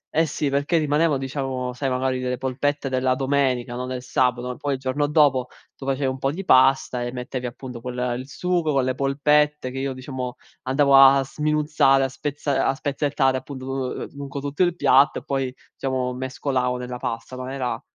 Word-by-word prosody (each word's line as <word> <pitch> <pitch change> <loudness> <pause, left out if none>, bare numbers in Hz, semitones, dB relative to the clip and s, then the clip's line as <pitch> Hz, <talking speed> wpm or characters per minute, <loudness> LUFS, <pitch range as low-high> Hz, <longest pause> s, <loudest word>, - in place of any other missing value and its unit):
eh 160 +1 +3
sì, 150 -1 -1
perché 145 +5 +1
rimanevo 150 0 +2
diciamo, 130 -2 -3
sai, 135 +2 -2
magari 130 0 0
delle 125 0 -2
polpette 140 +3 -1
della 130 -1 +1
domenica, 130 -3 0
no, 125 +1 -4
del 130 -1 -5
sabato, 125 0 0
poi 145 -2 -1
il - - -8
giorno 135 +3 0
dopo 145 -4 +3 0.3
tu 135 - -10
facevi 135 +1 0
un 130 0 -2
po' 135 - 0
di 185 +6 -6
pasta 130 -3 +4
e 120 - -3
mettevi 125 0 -4
appunto, 125 0 -8
quel 125 0 -2
il 130 - -8
sugo 175 0 0
con 135 -1 +2
le 130 0 0
polpette 145 +1 +1
che 135 - -5
io, 135 0 -2
diciamo, 130 -1 -5 0.3
andavo 140 +1 +4
a 135 0 +8
sminuzzare, 150 -1 +2
a 135 - 0
spezza 140 0 -1
a 135 - +1
spezzettare 140 -1 0
appunto, 130 0 -8
uhm, 135 -1 -3
lungo 140 0 -6
tutto 145 +4 -4
il 175 -2 +3
piatto 135 -4 +4
e - - -6
poi, 135 -1 -1 0.3
diciamo, 130 -2 -2
mescolavo 130 0 -1
nella 125 0 -5
pasta, 115 +2 -5
ma 130 0 -6
era 130 -2 -3
135 Hz, 190 wpm, -23 LUFS, 130-145 Hz, 0.3 s, a